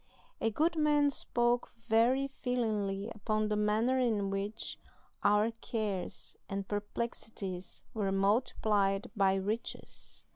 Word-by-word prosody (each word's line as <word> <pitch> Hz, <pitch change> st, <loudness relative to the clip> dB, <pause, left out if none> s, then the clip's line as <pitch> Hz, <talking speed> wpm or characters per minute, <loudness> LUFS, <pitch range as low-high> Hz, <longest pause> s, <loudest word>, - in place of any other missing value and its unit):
A 225 Hz, -, +2 dB
good 320 Hz, +9 st, +1 dB
man 295 Hz, -2 st, +4 dB
spoke 240 Hz, -2 st, +1 dB
very 245 Hz, +5 st, +4 dB
feelingly 215 Hz, -7 st, -1 dB
upon 215 Hz, +1 st, 0 dB
the 210 Hz, -, +1 dB
manner 215 Hz, +5 st, +2 dB
in 210 Hz, -6 st, +1 dB
which 200 Hz, +3 st, -3 dB, 0.4 s
our 210 Hz, +2 st, +4 dB
cares 215 Hz, -5 st, -4 dB
and 195 Hz, -1 st, -3 dB
perplexities 205 Hz, -3 st, -4 dB
were 205 Hz, -3 st, 0 dB
multiplied 200 Hz, -1 st, +2 dB
by 195 Hz, -2 st, +4 dB
riches. 205 Hz, +4 st, -4 dB
215 Hz, 110 wpm, -32 LUFS, 200-240 Hz, 0.4 s, man